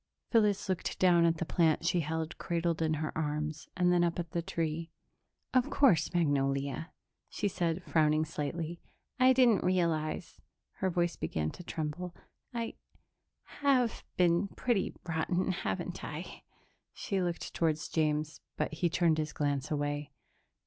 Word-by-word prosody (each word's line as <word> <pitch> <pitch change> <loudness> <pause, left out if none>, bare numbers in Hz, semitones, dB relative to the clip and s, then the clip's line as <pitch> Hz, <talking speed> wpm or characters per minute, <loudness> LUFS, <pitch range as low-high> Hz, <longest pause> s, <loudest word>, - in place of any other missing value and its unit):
Phyllis 210 -4 +3
looked 185 -2 -2
down 175 -2 +5
at 165 0 +3
the 170 - -2
plant 165 -1 +2
she 175 - +2
held 160 0 -3
cradled 170 -1 -1
in 160 -1 +2
her 155 0 -3
arms 150 0 -2
and 180 0 +4
then 175 -1 +4
up 170 -1 0
at 170 -2 -4
the 170 - -1
tree. 165 0 -2 0.6
"Of 255 -1 +3
course, 255 - +4
Magnolia," 140 -2 0 0.4
she - - -1
said, 175 -2 -1
frowning 155 -1 +3
slightly. 160 +2 -4 0.4
"I 255 0 +7
didn't 245 -6 +5
realize...." 170 -3 0 0.4
Her 190 - 0
voice 175 -1 0
began 80 -1 -2
to - - -10
tremble. 165 +2 -4 0.4
"I 235 -2 -4 0.8
have 260 -5 +2
been 175 +2 +3
pretty 220 0 -1
rotten, 175 +3 0
haven't 190 +1 -3
I?" - - -7 0.5
She 195 -3 -1
looked 175 -1 -3
toward 160 -2 +2 0.2
James, 155 -1 0 0.2
but - - -1
he 170 +2 +1
turned 165 -2 +2
his 155 0 -2
glance 145 -1 -1
away. 145 -1 -2
165 Hz, 145 wpm, -31 LUFS, 155-180 Hz, 0.8 s, I